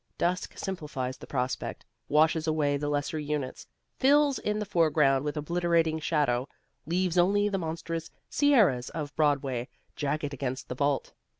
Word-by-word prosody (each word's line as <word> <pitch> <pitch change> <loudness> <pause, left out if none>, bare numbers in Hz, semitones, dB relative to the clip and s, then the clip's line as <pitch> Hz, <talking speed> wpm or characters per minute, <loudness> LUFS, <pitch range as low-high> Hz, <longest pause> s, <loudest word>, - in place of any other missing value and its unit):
Dusk 180 +1 -1
simplifies 145 -9 -4
the - - -10
prospect, 125 -2 -3 0.2
washes 155 +1 +3
away 150 -2 +2
the 145 +1 -2
lesser 145 +2 -1
units, 145 -3 -4 0.3
fills 285 +1 +4
in 210 0 -1
the 210 - -2
foreground 155 -7 +3
with 150 +1 -3
obliterating 165 0 +1
shadow, 140 -5 +1 0.4
leaves 180 +1 +1
only 205 +3 +3
the 195 -1 -1
monstrous 165 0 -4 0.2
sierras 215 - +3
of 150 -2 -5
Broadway 140 -5 +1 0.3
jagged 145 0 -2
against 130 -1 -4
the 125 - -3
vault. 140 +1 0
155 Hz, 140 wpm, -28 LUFS, 140-175 Hz, 0.4 s, fills